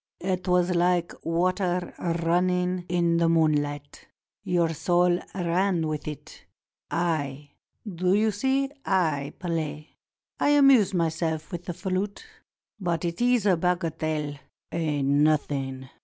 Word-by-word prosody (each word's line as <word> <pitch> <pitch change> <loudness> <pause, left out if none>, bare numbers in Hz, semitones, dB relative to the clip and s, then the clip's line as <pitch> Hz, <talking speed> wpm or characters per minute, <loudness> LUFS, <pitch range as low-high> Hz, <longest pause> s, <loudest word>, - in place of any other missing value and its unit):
It 185 0 -2
was 180 0 +3
like 175 0 +1
water 180 +1 0 0.3
running 180 +1 +1
in 170 -1 +2
moonHght. 150 -3 +1 0.4
Your 175 -4 +1
soul 175 +2 +2 0.2
ran 180 -1 +1
with 150 -1 -4
it. 150 -3 -9 0.4
I, 145 -4 -2 0.4
do 185 0 +1
you 215 +1 +2
see, 270 +6 0
I 155 -7 0
play. 155 -3 -4 0.5
I 290 0 +4
amuse 260 -9 +5
myself 160 -1 -1
with 175 -1 -6
the 175 -3 -5
flute; 190 +2 -3 0.5
but 175 -3 -1
it 170 +5 -3
is 245 -3 +3
a 190 -3 +5
bagatelle 160 -4 -2 0.2
— - - -58
a 155 -4 -1
nothing! 140 -2 +1
170 Hz, 120 wpm, -26 LUFS, 155-185 Hz, 0.5 s, amuse